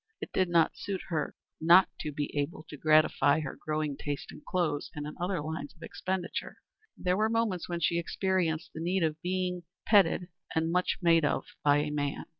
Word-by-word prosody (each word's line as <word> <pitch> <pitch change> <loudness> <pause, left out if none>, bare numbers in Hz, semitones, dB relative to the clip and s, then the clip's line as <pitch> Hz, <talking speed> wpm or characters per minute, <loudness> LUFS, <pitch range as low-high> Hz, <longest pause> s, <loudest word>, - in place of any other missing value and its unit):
It - - -7
did 185 -2 +2
not 170 -2 +3
suit 195 -2 -4
her 160 -4 -2 0.2
not 170 +4 +7
to 150 - -3
be 145 0 -4
able 145 +2 -2
to - - -7
gratify 155 0 +4
her 140 - -5
growing 155 -3 -2
taste 145 0 -5
in - - -12
clothes 155 -5 -1
and 150 0 -4
in 150 - -6
other 180 -2 0
lines 155 -2 -5
of 165 - -15
expenditure, 185 -2 -4 0.4
and - - -13
there 180 0 +3
were 215 +1 +2
moments 225 -7 0
when 170 -1 -2
she 170 +2 +2
experienced 170 -2 -1
the 160 - -6
need 180 +2 +1
of 155 0 -1
being 180 0 -1 0.2
petted 190 -3 +4 0.3
and 160 +1 +1
made - - -2
much 180 0 +2 0.3
of 150 - +1 0.2
by 145 0 +5
a 150 0 0
man. 145 -1 -2
165 Hz, 200 wpm, -30 LUFS, 150-180 Hz, 0.4 s, not